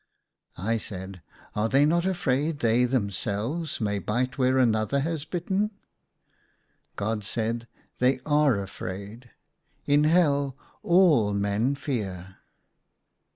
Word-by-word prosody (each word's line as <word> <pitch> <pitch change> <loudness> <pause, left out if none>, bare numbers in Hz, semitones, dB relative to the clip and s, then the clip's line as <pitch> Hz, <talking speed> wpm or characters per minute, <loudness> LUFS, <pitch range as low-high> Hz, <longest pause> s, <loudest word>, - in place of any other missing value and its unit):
I 115 +6 0
said, 95 -3 -7 0.2
" - - -25
Are 105 +2 +1
they 140 +4 +4
not 170 +4 +2
afraid 150 -4 0
they 120 -1 +3
themselves 120 - -2
may 105 -3 -1
bite 125 +7 -1
where 130 -1 +2
another 115 +1 +2
has 160 0 -3
bitten? 190 +5 -1 0.6
" - - -42
God 105 +1 -2
said, 115 +2 -2
" - - -38
They 130 +1 +3
are 145 -7 +3
afraid. 100 +4 -7 0.6
In 145 +1 +4
Hell 145 -5 +2 0.2
all 155 - +4
men 100 +7 0
fear." 95 - -4
125 Hz, 120 wpm, -26 LUFS, 105-145 Hz, 0.6 s, they